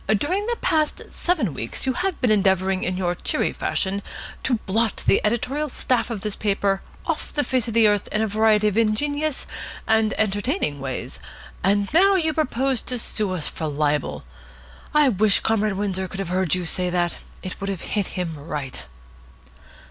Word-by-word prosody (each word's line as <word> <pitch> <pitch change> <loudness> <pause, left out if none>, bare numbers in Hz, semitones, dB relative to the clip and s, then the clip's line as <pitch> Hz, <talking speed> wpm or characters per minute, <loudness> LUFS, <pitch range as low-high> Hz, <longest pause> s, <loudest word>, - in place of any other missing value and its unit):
During 370 - -1
the 475 - 0
past 310 -1 +1
seven 310 - 0
weeks 115 - -4
you 260 - +1
have 365 +5 -2
been 245 -4 +3
endeavouring 190 -2 +2
in 180 0 -1
your 175 -2 0
cheery - - -1
fashion 195 +1 -1 0.4
to 255 - +2
blot 220 +3 +1
the - - +4
editorial 255 +7 0
staff 250 -2 +1
of 225 -4 -4
this 210 -1 -3
paper 200 -2 0 0.2
off - - -2
the 290 - +1
face 255 -5 0
of 230 - -4
the 225 -2 +6
earth 205 -1 +1
in 210 - +1
a - - +1
variety 215 0 +3
of 210 +1 +2
ingenious 285 +7 0 0.4
and 220 -1 +2
entertaining 205 - 0
ways; 135 -1 -5 0.4
and 200 +1 +2
now 390 +4 +6
you 320 -4 +1
propose 270 -4 0
to 250 - -3
sue 215 -3 0
us 170 -5 -2
for 160 - -4
libel! 145 - -1 0.7
I 300 -1 +5
wish 210 -2 +4
Comrade 215 -2 +1
Windsor 190 -2 -1
could 195 - -7
have 195 -3 -3
heard 185 -2 +1
you 180 -1 -3
say 180 +2 +1
that. 175 -1 0 0.2
It 185 - -6
would 195 - -2
have 195 -3 -3
hit 205 -3 -1
him 170 -3 -2
right." 140 - -5
210 Hz, 180 wpm, -23 LUFS, 185-255 Hz, 0.7 s, the